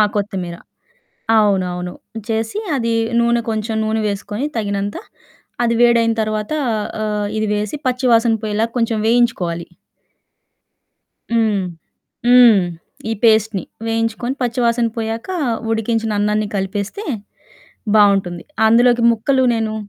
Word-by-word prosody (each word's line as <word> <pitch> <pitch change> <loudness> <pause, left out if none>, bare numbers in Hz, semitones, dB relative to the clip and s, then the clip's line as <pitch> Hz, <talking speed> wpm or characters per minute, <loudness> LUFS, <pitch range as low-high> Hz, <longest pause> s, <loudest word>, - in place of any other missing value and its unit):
కొత్తిమీర 190 -4 -3 0.8
అవునువును 180 -4 +1 0.3
చేసి 225 - -2 0.2
అది 230 -2 0 0.3
నూనె 235 0 +2
కొంచెం 220 0 -2
నూనె 220 +1 0
వేసుకొని 205 +4 -4
తగినంత 205 -1 -2 0.7
అది 235 - +2
వేడయిన 235 -1 +4
తర్వాత 215 +3 -3 0.5
ఆహ్, 210 -1 -1
ఇది 215 - 0
వేసి 210 +7 -2
పచ్చి 255 0 0
వాసన 230 0 +4
పొయ్యేలాగా 215 +2 -1
కొంచెం 230 -1 0
వేయించుకోవాలి. 210 -8 +1 1.7
హ్మ్. 220 -4 +2 0.6
హ్మ్. 245 -5 +7 0.5
ఈ - - +1
పేస్ట్‌ని. 220 -4 +3 0.2
వేయించుకొని 225 +3 -1
పచ్చి 245 0 -1
వాసన 235 0 +2
పోయాక 225 +3 -4 0.4
ఉడికించిన 225 0 0
అన్నాన్ని 210 0 0
కలిపేస్తే 200 - -3 0.9
బావుంటుంది. 195 -4 +3 0.2
అందులోకి 240 +2 +4
ముక్కలు 260 +4 +1
నేను 220 -1 -1
220 Hz, 105 wpm, -18 LUFS, 205-230 Hz, 1.7 s, హ్మ్